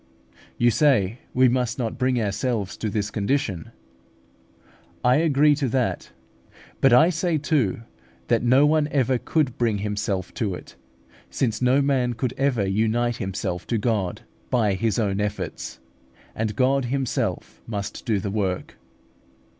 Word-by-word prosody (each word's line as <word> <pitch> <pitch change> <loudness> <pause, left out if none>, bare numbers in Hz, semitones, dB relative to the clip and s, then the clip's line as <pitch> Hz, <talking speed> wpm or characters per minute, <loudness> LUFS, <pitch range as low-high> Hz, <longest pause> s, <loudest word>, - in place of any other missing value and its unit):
You 120 0 +4
say, 120 -6 +2
we 130 0 +4
must 125 -1 0
not 115 -4 -3
bring 125 -1 +1
ourselves 105 -1 -2
to 110 - -2
this 105 0 -2
condition. 105 - -1 1.3
I 125 +2 +4
agree 150 -2 +4
to 140 -3 -1
that; 125 0 -1 0.7
but 135 - +5
I 160 +9 +6
say 165 -1 0
too, 140 - 0 0.4
that 115 - +2
no 130 +4 +5
one 150 0 +3
ever 130 -3 +1
could 145 -4 -1
bring 115 -3 +1
himself 100 -2 -3
to 100 -5 -2
it, - - -12 0.5
since 115 -4 -1
no 130 +3 +3
man 130 -3 +1
could 125 +1 -2
ever 130 -7 +1
unite 115 +4 +1
himself 95 -3 -4
to 115 - 0
God 105 -4 -1 0.3
by 110 -6 +2
his 105 +1 0
own 100 -3 0
efforts, 100 -4 -4 0.5
and 110 -2 -2
God 135 +1 +2
Himself 135 0 -2
must 100 -2 -5
do 110 -5 0
the 100 0 -4
work. 95 -3 -2
120 Hz, 145 wpm, -24 LUFS, 105-135 Hz, 1.3 s, I